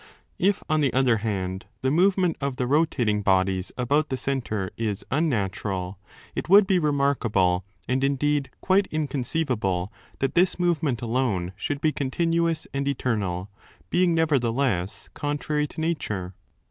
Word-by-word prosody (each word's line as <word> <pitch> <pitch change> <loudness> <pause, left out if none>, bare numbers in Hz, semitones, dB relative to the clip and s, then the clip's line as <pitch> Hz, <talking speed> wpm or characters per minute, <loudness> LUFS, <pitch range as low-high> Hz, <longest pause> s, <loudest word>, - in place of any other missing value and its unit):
If, 195 +2 +2
on 155 0 +2
the 140 -3 +2
other 130 -3 +3
hand, 95 -3 -3 0.2
the 130 - +2
movement 180 +1 +3
of 140 -2 -1
the 125 - -1
rotating 125 -7 +2
bodies 95 -1 +1
about 145 +5 +1
the 130 - -1
centre 115 -7 -2
is 105 -3 -3
unnatural, 100 - -1 0.3
it - - -4
would 200 +2 +8
be 190 -1 +3
remarkable 120 - +1 0.2
and 130 +1 0
indeed 140 +1 +1
quite 195 +1 +3
in 155 -1 -2
conceivable 120 - -1 0.2
that 135 -1 -1
this 180 +1 +3
movement 160 -9 0
alone 110 -7 0
should 145 +7 -3
be 155 - +3
continuous 165 +4 0
and 140 0 -1
eternal, 105 -8 -1 0.4
being 175 -1 +3
nevertheless 125 - 0
contrary 150 +1 -1
to - - -10
nature. 105 - -2
135 Hz, 140 wpm, -25 LUFS, 105-155 Hz, 0.4 s, would